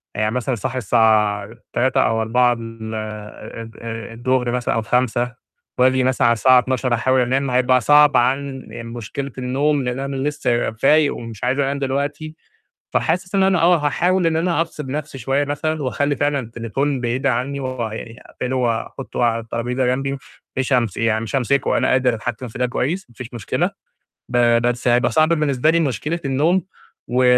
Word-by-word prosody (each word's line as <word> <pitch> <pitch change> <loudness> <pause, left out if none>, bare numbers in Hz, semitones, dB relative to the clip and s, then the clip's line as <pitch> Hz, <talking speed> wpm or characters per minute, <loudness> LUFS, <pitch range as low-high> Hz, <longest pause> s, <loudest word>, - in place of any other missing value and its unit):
يعني 110 0 0
مثلًا 125 +1 -1
صاحي 130 +3 -4
الساعة 105 -2 +2 0.2
15:00 130 +2 +2
أو 115 0 +1
16:00 120 +2 +3
ال 115 -1 -7
ال 110 +1 -7 0.4
الضُهر 125 +1 0
مثلًا 125 -1 -1
أو 115 - +1
17:00 125 +1 0 0.4
وآجي 130 0 +4
مثلًا 130 -1 +2
على 115 - +5
الساعة 125 +3 +5
00:00 125 0 -1
أحاول 130 +2 +2
أنام، 130 +2 0
هيبقى 125 0 +3
صعب 145 +3 +6
عن 135 +1 0 0.2
مشكلة 120 +4 -6
النوم، 135 +3 0
لإن 125 +1 -2
أنا 140 0 -3
لسه 130 -4 0
فايق 145 +6 +3
ومش 115 -2 -8
عايز 130 +3 +1
أنام 140 0 0
دلوقتي، 145 +3 -3 0.6
فحاسس 185 +4 0
إن 195 - +4
أنا 190 -2 +3
آه، 175 +2 +5
هاحاول 175 +4 +1
إن 160 - +1
أنا 170 0 +1
أفصِل 150 -5 -5
نَفسي 145 -2 -4
شوية 135 +4 0
مثلًا، 155 +1 -2
وأخلّي 140 +3 0
فعلًا 145 -1 0
التليفون 125 +3 -2
بعيد 125 +3 -1
عني، 135 +3 -1
ويعني 115 -3 -5
أقفلُه 125 +1 -4
وأحُطُّه 120 +1 -2
على 115 -1 +2
الترابيزة 120 +3 -2
جمبي، 135 +2 0
م 140 - -3 0.4
مش 130 +1 0
هامس 115 -6 +1
يعني 115 -1 +1
مش 115 - -4
هامسكُه، 135 +2 +1
أنا - - +2
قادِر 130 -2 +3
أتحكِم 120 +3 -5
في 110 - -9
ده 125 - +2
كويس، 150 +9 -2
ما 120 - -21
فيش 125 +1 -9
مشكلة، 115 -5 -1 0.6
ب 125 - -2 0.3
بس 120 0 0
هيبقى 120 +1 +3
صعب 155 0 +3
بالنسبة 150 -3 +2
لي 170 - +2
مشكلة 150 +4 -1
النوم، 155 +7 +2 0.5
و 125 +1 +2
130 Hz, 175 wpm, -20 LUFS, 120-140 Hz, 0.6 s, صعب